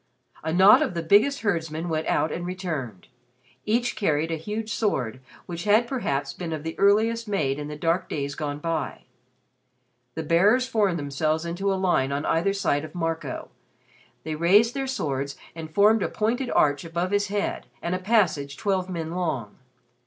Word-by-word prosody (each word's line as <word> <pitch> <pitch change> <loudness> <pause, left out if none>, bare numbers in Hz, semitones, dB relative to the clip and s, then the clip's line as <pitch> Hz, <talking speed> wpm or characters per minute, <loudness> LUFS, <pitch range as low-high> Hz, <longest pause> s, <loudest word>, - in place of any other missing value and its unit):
A 160 - -1
knot 190 +5 +7
of 180 - -1
the 170 - -2
biggest 215 - +4
herdsmen 165 -5 -1
went 160 -1 -2
out 155 - +1
and 175 - -4
returned. 160 - -5 0.6
Each 235 +3 +1
carried 160 -4 0
a - - 0
huge 210 +6 -4
sword 130 - -1 0.3
which 170 +1 -6
had 215 +3 +4
perhaps 225 - -2
been 170 -3 -5
of 155 -2 -5
the 160 0 -4
earliest 220 +3 +3
made 150 -9 0
in 145 - -5
the 150 - -6
dark 165 +4 0
days 140 -1 -3
gone 145 -1 -4
by. 165 +1 -3 1.1
The 160 - -3
bearers 205 +11 +3
formed 210 -8 +1
themselves 155 +2 -1
into 185 +4 -1
a - - +1
line 175 -8 +1
on 140 +2 -2
either 170 +5 +2
side 170 -7 0
of 155 +2 -9
Marco. 165 -1 -3 0.7
They 160 - -3
raised 200 +9 +4
their 270 -1 -2
swords 140 - -2 0.2
and 160 -1 -7
formed 210 +5 +4
a - - 0
pointed 245 +4 -1
arch 145 -1 +2
above 170 +2 -2
his 205 0 +1
head 205 +1 -2
and 170 - -3
a 185 - -1
passage 185 -9 +1
twelve 190 -2 -1
men 165 -3 -4
long. 160 - -3
170 Hz, 175 wpm, -25 LUFS, 155-205 Hz, 1.1 s, knot